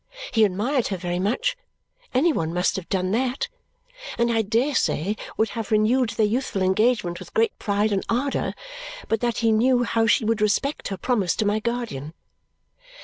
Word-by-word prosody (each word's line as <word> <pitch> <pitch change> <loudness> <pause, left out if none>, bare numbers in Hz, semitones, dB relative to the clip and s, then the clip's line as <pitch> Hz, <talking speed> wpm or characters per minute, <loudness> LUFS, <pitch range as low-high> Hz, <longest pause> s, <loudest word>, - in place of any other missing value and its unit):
He 220 -2 +5
admired 220 +7 0
her 195 - -3
very 175 0 -3
much 250 - 0 0.6
any 305 +6 +3
one 160 - -1
must 180 +1 +1
have 190 -3 -6
done 185 -1 0
that 255 - -1 0.7
and 235 0 +2
I 225 - +3
dare 230 +7 +1
say 200 - 0 0.2
would 220 - +2
have 225 -3 -5
renewed 220 +3 +3
their 220 - +1
youthful 210 -3 -1
engagement 190 -2 +1
with 185 -2 -12
great 225 +1 +2
pride 205 +1 0
and 195 -1 0
ardour 265 +4 -1 0.5
but 225 - +1
that 240 0 -1
he 225 - +5
knew 245 +3 +3
how 225 -1 +1
she 230 - +3
would 225 0 0
respect 215 +8 0
her 195 - -4
promise 200 -3 0
to 215 - 0
my 205 +1 +1
guardian. 220 - -4
220 Hz, 180 wpm, -24 LUFS, 195-245 Hz, 0.7 s, He